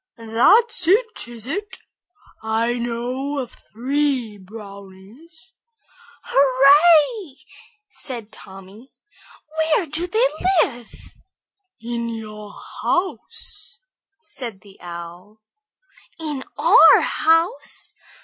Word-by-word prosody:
"That's 330 - +3
it, 440 - +1
is 235 -2 -8
it? 385 +7 -5 0.6
I 230 +2 0
know 245 +4 -3
of 255 -4 -5 0.2
three 255 -3 -1
brownies." 205 - -13 0.7
"Hurrah!" 295 - +4 0.5
said 235 - -6
Tommy. 195 +6 -14 0.7
"Where 315 +3 +2
do 320 +4 -2
they 450 +6 +2 0.4
live?" 240 -3 -7 0.9
"In 235 0 -4
your 215 -2 -8 0.3
house," 375 +3 -3 0.4
said 235 - -7
the 200 -2 -18
Owl. 175 +4 -10 0.8
"In 295 -5 -5
our - - +7
house! 330 +8 0
250 Hz, 80 wpm, -21 LUFS, 220-320 Hz, 0.9 s, our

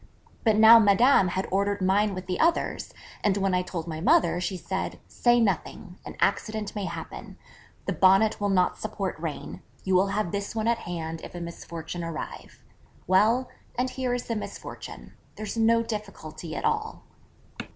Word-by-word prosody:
But 220 -2 +4
now 220 +2 +9
Madame 210 +1 +5
had 185 +2 -2
ordered 200 +1 +1
mine 195 +2 +2
with 185 - -6
the 180 -1 -3
others: 335 +1 +1 0.3
and 205 -2 +2
when 195 -1 +1
I 180 - +2
told 175 -3 -5
my 160 -2 -5
mother, 285 - +3
she 185 +1 -2
said, 190 +2 -4
'Say 240 0 +3
nothing: 195 -3 -2
an - - -9
accident 215 +1 -1
may 205 -2 -2
happen, - - -7 0.5
the - - -1
Bonnet 195 +3 +4
will 205 - +1
not 185 -2 +2
support 205 -3 -3
rain, 160 -2 -6 0.2
you 190 - 0
will 185 +2 +4
have 200 -3 -1
this 200 +2 -4
one 220 0 -1
at 235 0 +2
hand 165 -2 -4
if - - -9
a - - -5
misfortune 170 0 -6
arrive. 165 -2 -7 0.4
Well, 220 +8 +3 0.3
and 255 +1 0
here 255 -2 -1
is 245 - -3
the 230 - -3
misfortune: 210 - -8 0.2
there's 215 0 -5
no 230 0 +3
difficulty 200 -7 -6
at - - -3
all.' - - -1
200 Hz, 170 wpm, -26 LUFS, 180-220 Hz, 0.5 s, now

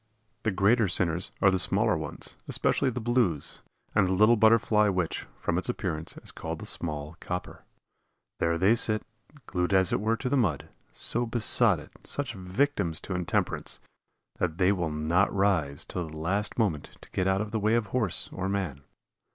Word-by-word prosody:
The - - 0
greater 105 +3 +2
sinners 85 0 0
are 95 - +6
the 95 - +1
smaller - - +2
ones, - - -5
especially 135 - +1
the 125 0 -4
blues, 115 - 0 0.3
and 100 -3 +3
the 95 - 0
little 105 +5 +5
Butterfly 110 -1 +4
which, 90 -4 -2
from - - -1
its - - -6
appearance, 80 +1 -3
is - - -2
called - - -6
the - - -9
"small 75 0 -4
copper." 90 0 -6 0.7
There 85 0 +1
they 95 +6 +4
sit, 110 -2 +2 0.4
glued 90 +1 -1
as 95 -1 +3
it - - 0
were 110 +2 0
to 125 - -4
the 135 - +1
mud 95 - 0 0.2
so 120 +1 +2
besotted, 115 -1 +6
such - - -3
victims 95 - -1
to 95 - -5
intemperance, 90 -1 -2 0.6
that 85 -3 -1
they 95 +1 +3
will 90 -5 -1
not 80 +6 +1
rise 90 -8 +1
till 90 -2 -4
the 80 - -10
last 100 +7 -1
moment 95 -11 -2
to - - -17
get 95 - -1
out 95 +1 +1
of 105 -1 -5
the 110 - -1
way 110 +2 +2
of 115 -2 +1
horse 110 -9 0
or 95 +1 -3
man. 95 -9 -3
95 Hz, 180 wpm, -27 LUFS, 85-110 Hz, 0.7 s, are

